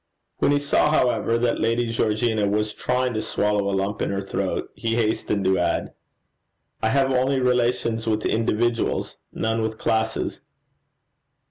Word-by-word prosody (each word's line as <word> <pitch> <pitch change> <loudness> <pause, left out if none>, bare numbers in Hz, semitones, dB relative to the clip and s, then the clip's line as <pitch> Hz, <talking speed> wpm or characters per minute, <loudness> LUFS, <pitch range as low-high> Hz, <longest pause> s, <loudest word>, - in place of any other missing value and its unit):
When - - +3
he 145 - +4
saw, 145 +1 +2
however, 125 -5 +2
that 120 0 0
Lady 115 +2 +1
Georgina 110 -1 +1
was 105 +1 0
trying 125 0 -1
to 110 - -1
swallow 105 -1 0
a 95 - 0
lump 100 +2 -2
in - - 0
her 100 - -1
throat, 95 - -3
he 115 0 -2
hastened 105 -3 0
to 95 0 +3
add, - - -1 0.9
'I 110 - +2
have 135 +2 +2
only 130 +1 +2
relations 120 -2 +1
with 110 -1 0
individuals 115 +1 0
none 115 0 -1
with 110 0 -2
classes.' 110 0 -1
115 Hz, 150 wpm, -23 LUFS, 105-120 Hz, 0.9 s, he